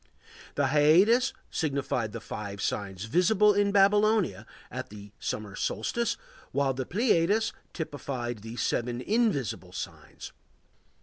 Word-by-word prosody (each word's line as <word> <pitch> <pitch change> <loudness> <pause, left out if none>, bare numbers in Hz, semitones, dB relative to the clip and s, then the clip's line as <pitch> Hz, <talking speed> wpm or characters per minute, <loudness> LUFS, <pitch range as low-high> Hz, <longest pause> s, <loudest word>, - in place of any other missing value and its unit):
The 140 -2 +2
Hyades 170 - +5 0.2
signified 135 -7 -1
the 115 - -6
five 105 -3 -6
signs 100 -1 -3
visible 195 - +4
in 200 0 +2
Babylonia 200 - +3 0.2
at - - -5
the 105 -1 -11
summer 105 -2 -4
solstice, 235 - -1 0.3
while 140 -1 +1
the 130 0 -4
Pleiades 210 0 +2 0.2
typified 130 -7 -4
the 115 +3 -8
seven 120 0 -1
invisible 205 - 0
signs. - - -8
140 Hz, 115 wpm, -28 LUFS, -, 0.3 s, Hyades